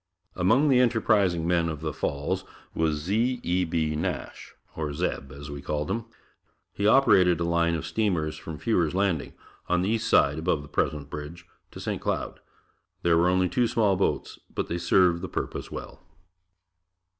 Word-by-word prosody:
Among 115 Hz, +12 st, +3 dB
the 130 Hz, -3 st, +5 dB
enterprising 105 Hz, -8 st, +2 dB
men 85 Hz, -1 st, +2 dB
of 75 Hz, -2 st, -5 dB
the 80 Hz, -1 st, -3 dB
Falls 70 Hz, +1 st, -2 dB, 0.3 s
was 80 Hz, -2 st, +1 dB
Z. 115 Hz, +9 st, 0 dB
E. 90 Hz, +1 st, +1 dB
B. 80 Hz, -2 st, -1 dB
Nash, 75 Hz, -, -4 dB, 0.2 s
or 75 Hz, -2 st, -3 dB
"Zeb" 70 Hz, -4 st, -3 dB
as 70 Hz, +2 st, -9 dB
we 70 Hz, -1 st, -6 dB
called 75 Hz, 0 st, -2 dB
him. 115 Hz, -1 st, -2 dB, 0.7 s
He 100 Hz, -, 0 dB
operated 95 Hz, -, +5 dB
a -, -, 0 dB
line 85 Hz, 0 st, +1 dB
of 80 Hz, -1 st, -4 dB
steamers 85 Hz, -4 st, 0 dB
from 80 Hz, -2 st, -8 dB
Fewer's 90 Hz, -5 st, 0 dB
Landing, 95 Hz, -6 st, 0 dB, 0.4 s
on 90 Hz, 0 st, +2 dB
the 95 Hz, -, 0 dB
East 110 Hz, 0 st, 0 dB
Side 70 Hz, +2 st, +4 dB
above 80 Hz, -3 st, 0 dB
the -, -, -11 dB
present 75 Hz, 0 st, -2 dB
bridge, 75 Hz, +3 st, -7 dB, 0.2 s
to -, -, -11 dB
St. -, -, -3 dB
Cloud. -, -, -3 dB, 0.6 s
There 85 Hz, -1 st, +4 dB
were 85 Hz, +2 st, +4 dB
only 90 Hz, 0 st, +2 dB
two 120 Hz, +7 st, +1 dB
small 105 Hz, -4 st, +2 dB
boats, 95 Hz, -, -1 dB
but -, -, -3 dB
they 85 Hz, -, -2 dB
served 85 Hz, 0 st, +3 dB
the 95 Hz, -, -5 dB
purpose -, -, -4 dB
well. -, -, -8 dB
85 Hz, 175 wpm, -26 LUFS, 80-100 Hz, 0.7 s, the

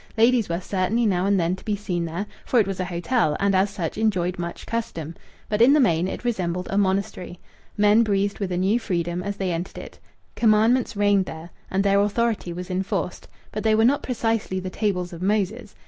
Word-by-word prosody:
Ladies 230 Hz, -2 st, +4 dB
were 170 Hz, +1 st, -1 dB
certainly 195 Hz, +5 st, 0 dB
now 190 Hz, -2 st, +1 dB
and 200 Hz, -1 st, +3 dB
then 170 Hz, +1 st, +1 dB
to 190 Hz, -, -15 dB
be 210 Hz, -, -1 dB
seen 180 Hz, -4 st, -3 dB
there, 170 Hz, +5 st, -4 dB, 0.2 s
for 245 Hz, -, +2 dB
it 215 Hz, -, +4 dB
was 195 Hz, -1 st, -4 dB
a 185 Hz, -, -1 dB
hotel 175 Hz, -1 st, 0 dB
and 200 Hz, 0 st, +2 dB
as 190 Hz, +2 st, +3 dB
such 195 Hz, -1 st, -4 dB
enjoyed 185 Hz, -5 st, 0 dB
much 170 Hz, 0 st, -5 dB
custom. 170 Hz, -9 st, -4 dB, 0.3 s
But 210 Hz, +1 st, 0 dB
in 255 Hz, +4 st, +7 dB
the 300 Hz, -, +5 dB
main 180 Hz, -, +3 dB
it 215 Hz, -, -6 dB
resembled 180 Hz, -6 st, -1 dB
a 195 Hz, -, 0 dB
monastery. 190 Hz, -2 st, -1 dB, 0.4 s
Men 210 Hz, +2 st, +5 dB
breathed 200 Hz, -2 st, 0 dB
with 195 Hz, -3 st, -2 dB
a 175 Hz, -, -1 dB
new 195 Hz, +6 st, +2 dB
freedom 175 Hz, -5 st, -2 dB
as 200 Hz, +2 st, -4 dB
they 190 Hz, -2 st, -1 dB
entered 170 Hz, +2 st, -4 dB
it. -, -, -10 dB, 0.4 s
Commandments 225 Hz, +2 st, +3 dB
reigned 205 Hz, -2 st, +3 dB
there, 160 Hz, +1 st, -9 dB, 0.2 s
and 195 Hz, +1 st, +1 dB
their 200 Hz, 0 st, +3 dB
authority 210 Hz, -2 st, 0 dB
was 180 Hz, +2 st, -6 dB
enforced; 185 Hz, -1 st, -3 dB, 0.2 s
but 215 Hz, -, -4 dB
they 220 Hz, -1 st, +3 dB
were 220 Hz, +1 st, +4 dB
not 280 Hz, +4 st, +3 dB
precisely 225 Hz, -6 st, -1 dB
the 185 Hz, 0 st, -5 dB
tables 180 Hz, -5 st, -1 dB
of 170 Hz, -, -8 dB
Moses. 210 Hz, +3 st, -1 dB
195 Hz, 210 wpm, -24 LUFS, 180-215 Hz, 0.4 s, in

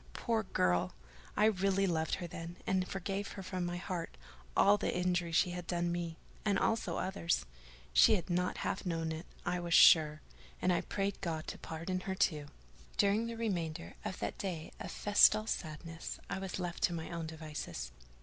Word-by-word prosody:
Poor 230 Hz, -2 st, 0 dB
girl! 90 Hz, -, +1 dB, 0.4 s
I 210 Hz, -, +5 dB
really 195 Hz, -2 st, +3 dB
loved 160 Hz, -4 st, +1 dB
her 180 Hz, -, -5 dB
then; 170 Hz, 0 st, -7 dB
and 185 Hz, -1 st, +1 dB
forgave 195 Hz, +1 st, -3 dB
her 195 Hz, -, -7 dB
from 185 Hz, -1 st, -3 dB
my 175 Hz, 0 st, -3 dB
heart 175 Hz, -, -4 dB, 0.4 s
all 200 Hz, +1 st, +7 dB
the 205 Hz, -, -1 dB
injury 180 Hz, -1 st, +1 dB
she 175 Hz, +2 st, +3 dB
had 175 Hz, -1 st, -6 dB
done 175 Hz, -1 st, 0 dB
me—and 175 Hz, +4 st, -3 dB
others 225 Hz, +3 st, +1 dB
also: 185 Hz, -2 st, -3 dB, 0.7 s
she 215 Hz, -, +7 dB
had 180 Hz, -, -3 dB
not 180 Hz, 0 st, 0 dB
half -, -, -1 dB
known 165 Hz, -3 st, -1 dB
it, 160 Hz, +3 st, -6 dB, 0.2 s
I 175 Hz, 0 st, 0 dB
was 170 Hz, -1 st, +1 dB
sure; 155 Hz, -2 st, +7 dB, 0.4 s
and 180 Hz, -, +3 dB
I -, -, +2 dB
prayed 200 Hz, 0 st, -2 dB
God 160 Hz, -3 st, -2 dB
to -, -, -6 dB
pardon 165 Hz, +3 st, -3 dB
her 190 Hz, +1 st, -3 dB
too. 155 Hz, -7 st, +1 dB, 0.5 s
During 205 Hz, +3 st, +3 dB
the 230 Hz, 0 st, -5 dB
remainder 170 Hz, -7 st, -2 dB
of 185 Hz, -, -4 dB
that -, -, -4 dB
day 175 Hz, -5 st, -4 dB
of -, -, -5 dB
festal 210 Hz, +1 st, +5 dB
sadness, 165 Hz, -4 st, -5 dB
I -, -, -1 dB
was 190 Hz, -1 st, -4 dB
left 175 Hz, -1 st, -4 dB
to 175 Hz, -, -1 dB
my 160 Hz, 0 st, -5 dB
own 170 Hz, -1 st, -3 dB
devices. 155 Hz, -, -6 dB
175 Hz, 180 wpm, -34 LUFS, 165-195 Hz, 0.7 s, all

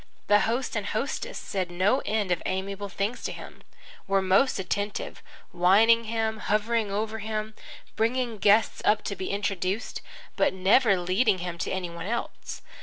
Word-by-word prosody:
The 205 Hz, 0 st, +5 dB
host 250 Hz, +3 st, -1 dB
and -, -, -2 dB
hostess -, -, -3 dB
said 185 Hz, -3 st, -3 dB
no 190 Hz, +9 st, +2 dB
end 210 Hz, -3 st, 0 dB
of 175 Hz, -, +1 dB
amiable 195 Hz, +2 st, -3 dB
things 205 Hz, +5 st, -2 dB
to -, -, -2 dB
him, -, -, -10 dB, 0.5 s
were 195 Hz, -, +3 dB
most 195 Hz, +8 st, +3 dB
attentive, 205 Hz, +2 st, -3 dB, 0.3 s
wining 215 Hz, +6 st, +5 dB
him, 220 Hz, -1 st, -1 dB
hovering 215 Hz, +1 st, 0 dB
over 215 Hz, +2 st, -2 dB
him, 215 Hz, 0 st, -3 dB, 0.4 s
bringing 235 Hz, -1 st, 0 dB
guests 205 Hz, +3 st, +3 dB
up 210 Hz, -, +3 dB
to 200 Hz, -, -3 dB
be 185 Hz, -, -5 dB
introduced, 195 Hz, +1 st, -2 dB, 0.4 s
but -, -, +2 dB
never 195 Hz, +3 st, +4 dB
leading 185 Hz, +4 st, +2 dB
him 175 Hz, -1 st, -5 dB
to -, -, -2 dB
any 180 Hz, -2 st, -3 dB
one 170 Hz, +1 st, -6 dB
else. 235 Hz, +2 st, -4 dB
205 Hz, 160 wpm, -27 LUFS, 190-220 Hz, 0.5 s, The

